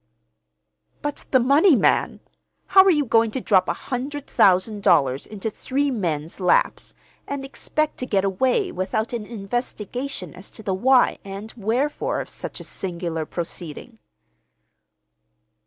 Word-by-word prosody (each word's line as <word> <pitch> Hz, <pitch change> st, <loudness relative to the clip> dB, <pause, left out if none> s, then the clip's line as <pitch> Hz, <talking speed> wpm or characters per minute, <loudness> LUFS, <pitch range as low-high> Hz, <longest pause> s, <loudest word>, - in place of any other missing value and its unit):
"But 290 Hz, 0 st, -3 dB
the 260 Hz, -, +4 dB
money, 280 Hz, +7 st, +5 dB
man! -, -, +2 dB, 0.4 s
How 380 Hz, -, +7 dB
are -, -, +6 dB
you 300 Hz, -5 st, +3 dB
going 225 Hz, -1 st, +3 dB
to 240 Hz, -, -3 dB
drop 190 Hz, -6 st, +3 dB
a -, -, +2 dB
hundred 275 Hz, +3 st, -5 dB
thousand 200 Hz, +3 st, +3 dB
dollars 140 Hz, -7 st, +3 dB
into 215 Hz, +1 st, -5 dB
three 280 Hz, +5 st, -1 dB
men's 165 Hz, -, -3 dB
laps, 180 Hz, -2 st, +1 dB, 0.3 s
and 280 Hz, -1 st, -4 dB
expect 305 Hz, +2 st, -2 dB
to 255 Hz, -, -4 dB
get 195 Hz, -4 st, +1 dB
away 260 Hz, -, +1 dB
without 215 Hz, -, -2 dB
an 220 Hz, -3 st, -4 dB
investigation 230 Hz, -, -4 dB
as 190 Hz, -, -10 dB
to 220 Hz, -, -12 dB
the 195 Hz, -, -1 dB
why 250 Hz, +7 st, +3 dB
and 200 Hz, +3 st, -7 dB
wherefore 260 Hz, -, -1 dB
of -, -, -6 dB
such -, -, -7 dB
a -, -, -8 dB
singular 170 Hz, -4 st, -4 dB
proceeding?" 175 Hz, +6 st, -6 dB
220 Hz, 140 wpm, -23 LUFS, 185-270 Hz, 0.4 s, How